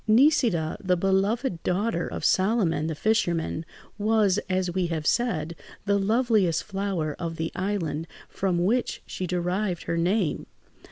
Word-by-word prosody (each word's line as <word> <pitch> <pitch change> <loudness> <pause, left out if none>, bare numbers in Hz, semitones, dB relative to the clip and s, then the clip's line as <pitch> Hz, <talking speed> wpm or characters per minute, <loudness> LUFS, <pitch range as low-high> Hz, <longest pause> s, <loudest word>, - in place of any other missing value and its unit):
Nisida, 230 - +3
the 180 -1 +2
beloved 195 +2 +1
daughter 185 -1 0
of - - -4
Solomon, 185 -6 +2
the 160 - -2
fisherman, 170 -5 0 0.3
was, 210 -2 +3
as 185 -1 0
we 185 -1 0
have 160 -3 -3
said, 170 -7 0 0.3
the 200 0 +2
loveliest 215 -5 +2
flower 195 -6 -2
of 165 -2 -3
the 160 0 -3
island 175 -5 -2 0.2
from 180 -2 0
which 240 +5 0
she 185 - -4
derived 180 +1 -1
her 170 - -2
name. 180 0 0
185 Hz, 135 wpm, -26 LUFS, 170-210 Hz, 0.3 s, Nisida